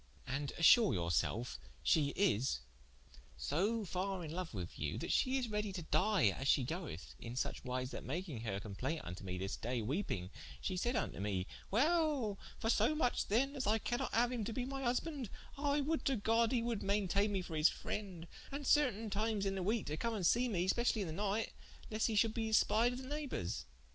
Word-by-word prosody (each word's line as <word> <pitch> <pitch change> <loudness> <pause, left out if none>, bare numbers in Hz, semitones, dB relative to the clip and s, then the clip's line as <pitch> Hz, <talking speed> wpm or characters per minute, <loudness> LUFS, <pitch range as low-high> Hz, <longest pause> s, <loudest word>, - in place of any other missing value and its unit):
And 135 +2 -2
assure 215 - +7
your 85 -1 -1
selfe 105 - 0 0.2
she 150 -3 +4
is 135 - +2 0.8
so 200 - 0
farre 185 0 -2
in 155 +1 -6
loue 185 -1 -2
with 90 -5 -6
you, 75 +1 -2
that - - -3
she 260 +1 +3
is 255 -2 -1
redie 210 -1 -1
to 175 - -4
die 190 - +3
as 135 +7 -3
she 135 - +4
goeth, 155 - -5
in 115 +1 -6
such 130 - -2
wise 125 0 -2
that - - -6
making 155 -4 -4
her 100 -4 -2
complaint 120 +10 -3
vnto 90 +1 -6
me 90 -2 -4
this 95 +1 -3
day 120 +2 -2
weeping, 110 - -2 0.3
she 185 - -2
said 240 +7 0
vnto 220 - -1
me: 100 -3 -1 0.2
'Well, 280 - +2 0.2
for 225 - +1
so 230 +7 +3
much 245 -6 +1
then 270 +7 +2
as 260 -5 -2
I 215 +2 +4
cannot 240 +4 -2
haue 240 +1 +3
him 245 -3 -2
to 225 - -3
be 245 +2 -2
my 270 +1 -4
husbande, 255 0 -1 0.3
I 285 +1 +1
would 315 +3 0
to 275 - +3
God 225 +2 +2
he 240 -3 +1
would 235 -3 -1
mainteigne 200 0 +2
me 195 -2 -1
for 165 -3 -6
his 155 +2 +5
frende, 185 -5 -5 0.3
and 280 +1 -4
certaine 235 -8 +3
times 210 0 0
in 195 - +1
the 190 - -2
weeke 215 +4 0
to 150 - -3
come 230 +4 -1
to 200 - -2
see 240 +8 +4
mee 180 -4 0
specially 235 +1 +2
in 190 - -2
the - - -4
night, 205 +4 -1 0.4
lest 215 +1 +1
he 225 - -1
should 220 +1 +3
be 225 -1 -1
espied 225 +2 +4
of 255 +2 -6
the - - -8
neighbours. 295 -1 -3
205 Hz, 215 wpm, -36 LUFS, 145-240 Hz, 0.8 s, assure